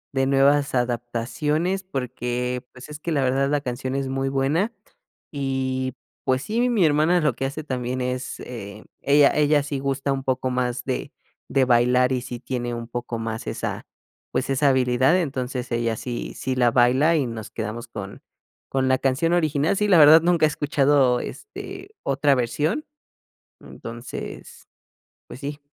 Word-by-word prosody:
de 135 0 +2
nuevas 140 +1 +3
adaptaciones 125 +9 -1
porque, 125 -5 -3
pues, 125 +3 -12
es 150 0 -8
que 170 - -4
la 140 -3 +1
verdad 135 +2 +1
la 145 -1 +1
canción 130 0 -4
es 135 -1 -1
muy 135 0 -1
buena 145 +12 0 0.6
y, 130 -2 -2 0.3
pues, 130 0 +1
sí, 240 +3 0
mi 210 -6 +3
hermana 155 +4 +3
lo 150 -5 +2
que 135 - -2
hace 145 +3 -4
también 130 -2 -3
es 125 +1 -3
eh, 105 -3 -8 0.2
ella 140 0 +5
ella 150 -1 +4
sí 145 0 -4
gusta 135 0 -1
un 135 -1 -4
poco 130 -1 0
más 125 -1 -2
de 130 -2 -3 0.4
de 135 -1 +3
bailar 125 +1 +3
y 125 - -1
sí 125 -1 -7
tiene 120 -1 -3
un 115 -1 -5
poco 120 -1 -4
más 115 0 -4
esa, - - -4 0.5
pues, 130 +1 -1
esa 135 +1 +3
habilidad, 130 +3 +3
entonces 130 -4 -4
ella 115 -1 0
sí 120 -2 -5
sí 130 0 -2
la 120 -2 +3
baila 130 +7 +4
y 145 -5 +1
nos 110 -2 -7
quedamos 115 +2 -5
con 100 -4 -8 0.5
con 130 -1 +1
la 130 - +4
canción 135 +6 +1
original. 155 +1 +1
Sí, 210 +1 +1
la 185 -4 +6
verdad 155 +1 +9
nunca 170 -2 +3
he - - +3
escuchado, 140 -4 +2
este, 400 -2 -8
otra 140 0 +2
versión. 145 - -1 0.7
Entonces, 120 +2 -9 0.6
pues 125 - -10
sí. 145 +1 -5
130 Hz, 165 wpm, -23 LUFS, 125-145 Hz, 0.7 s, verdad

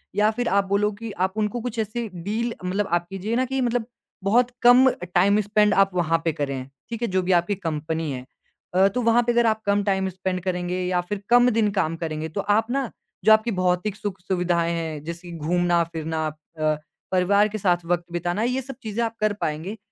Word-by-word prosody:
या 210 +1 +4
फिर 245 +2 -2
आप 200 0 +2
बोलो 200 +2 +2
कि 230 -1 -5 0.2
आप 190 - -18
उनको 215 +2 -1
कुछ 235 -1 -4
ऐसी 225 +2 -2
डील 215 +7 -2
मतलब 195 +3 0
आप 175 0 +1
कीजिए 195 +4 -3
ना, 255 +2 +2
कि 265 +1 -2
मतलब 240 -2 0 0.4
बहुत 235 +5 +3
कम 250 +2 +8 0.3
टाइम 200 +4 +4
स्पेंड 210 +1 +3
आप 195 0 +4
वहाँ 165 -2 +2
पे 165 - +2
करें, 140 -3 -3 0.2
ठीक 230 0 -5
है? 235 - +1
जो 185 -2 +1
भी 185 +1 -1
आपकी 175 +4 -2
कंपनी 160 -3 -3
है। 125 -1 -6 0.5
अ, 190 +1 +6
तो 215 +6 -1
वहाँ 230 +1 +4
पे 240 - +1
अगर 240 0 +3
आप 220 -1 +1
कम 205 0 +2
टाइम 190 -1 +1
स्पेंड 185 0 -3
करेंगे 180 0 -2
या 180 0 +1
फिर 195 +3 -5
कम 245 +1 +6
दिन 220 -3 +2
काम 175 -5 0
करेंगे, 160 -1 -4
तो 200 +6 -3
आप 220 +4 +1
ना 270 -2 -1 0.4
जो 220 - +7
आपकी 220 +2 +2
भौतिक 180 +3 +1
सुख-सुविधाएँ 180 -4 -1
हैं, 160 -3 -4
जैसे 170 +2 -7
कि 170 - -7
घूमना-फिरना 165 -1 0
अ, 155 +1 -9 0.5
परिवार 200 +3 +4
के 215 - -4
साथ 175 -4 +1
वक़्त 175 0 0
बिताना, 175 +4 -1
ये 250 +2 0
सब 270 +1 -8
चीज़ें 220 +1 -2
आप 225 0 -4
कर 215 -1 +2
पाएँगे। 160 +8 -3
195 Hz, 210 wpm, -24 LUFS, 175-220 Hz, 0.5 s, कम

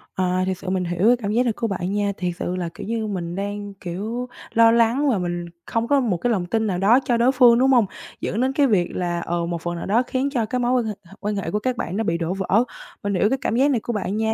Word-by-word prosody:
À, 185 0 +1
thiệt 190 -1 -2
sự 190 - -6
mình 185 -1 0
hiểu 175 +4 +1
cái 245 - +6
cảm 205 -4 -3
giác 235 +3 +3
này 235 -3 0
của 230 +2 -2
bạn 185 -2 -3
nha. 205 0 0
Thiệt 180 -1 -1
sự 180 - -2
là, 175 -2 -3
kiểu - - -7
như, 225 -1 -2
mình 175 -4 -4
đang, 205 +1 -4
kiểu, 205 +7 -5 0.3
lo 230 0 +6
lắng 235 +5 +3
là 235 - +2
mình 175 -1 -3 0.2
không 230 0 -1
có 285 +1 +4
một 225 -9 0
cái 240 +8 0
lòng 190 -6 0
tin 220 +4 0
nào 185 -3 -1
đó 210 +7 +5
cho 240 - +2
đối 240 +3 +4
phương, 245 -3 +6
đúng 265 +1 +4
hông? 240 -5 +5 0.4
Dẫn 220 - -1
đến 260 +1 +1
cái 280 0 +3
việc 185 -7 +1
là, 175 -1 -1
ờ, 170 0 -2
một 170 -1 -3
phần 175 +1 -3
nào 170 - -5
đó 225 +5 +2
khiến 265 +2 0
cho 245 -5 0
cái 250 +4 -2
mối 245 0 +1
quan 245 -2 +2
hệ 215 - -2
hệ 170 - -16
quan 210 0 -2
hệ 195 - -3
của 210 - 0
các 250 +3 -2
bạn 185 -4 -3
nó 225 - 0
bị 170 -5 0
đổ 170 +1 -2
vỡ. 195 +4 +2 0.4
Mình 200 0 -1
hiểu 205 +3 +3
cái 270 - +1
cảm 230 - -1
giác 275 +4 +4
này 250 - +2
của 235 - -4
bạn 205 -1 -2
nha, 220 0 +1
210 Hz, 300 wpm, -22 LUFS, 185-240 Hz, 0.4 s, cái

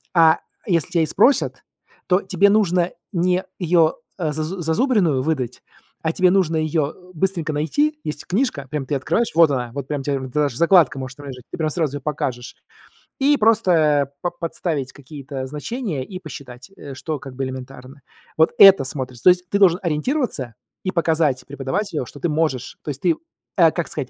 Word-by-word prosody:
А 160 -1 +6 0.3
если 170 -7 0
тебя 170 -2 +2
и - - +2
спросят, 240 - +2 0.4
то 180 +1 +3
тебе 200 +1 +3
нужно 180 -4 +2 0.2
не 180 0 +1 0.2
ее, 165 -3 +3 0.2
а, 165 -5 -1
зазу 155 +5 -4
зазубренную 170 - +2
выдать, 130 -4 -2 0.4
а 160 0 -1
тебе 185 0 +3
нужно 180 -4 +2
ее 155 -1 0 0.2
быстренько 170 -2 -1
найти. 295 - 0
Есть 150 -1 -5
книжка, 185 - -1
прям 150 -2 -3
ты 145 - -2
открываешь, 220 - 0
вот 165 -3 +6
она, 125 -3 -2
вот 140 -1 -5
прям 145 -2 -2
тебе 140 0 -1
д 130 - -5
даже 145 -1 0
закладка 170 -4 +4
может 130 0 -7
там 145 -1 -10
лежать, 125 -2 -8
ты - - -6
прям 155 -1 0
сразу 150 -3 -1
ее - - -10
покажешь, 130 -3 -4 0.6
и 285 +2 +4
просто 165 - +3
па 175 - 0
подставить 165 -5 -3
какие-то 135 -1 -7
значения 150 - -4
и 185 +4 -8
посчитать, 140 -5 -10
э, 140 - -9
что 155 +3 -4
как 130 -1 -10
бы 135 +1 -2
элементарно. 130 +1 -9 0.4
Вот 160 0 +4
это 195 -6 +9
смотрится. 130 -3 -6
То - - +10
есть 180 0 -2
ты 200 - +1
должен 180 -3 +5
ориентироваться 160 - -1 0.3
и 185 - -1
показать 160 -6 +1
преподавателю, 140 +4 -3
что 145 - -12
ты 175 - 0
можешь. 150 -5 -1
То - - -6
есть 140 -2 -4
ты, 330 - +3 0.4
э, 165 -3 +6
как 170 0 -3
сказать, 135 -4 -5
155 Hz, 185 wpm, -21 LUFS, 140-180 Hz, 0.6 s, То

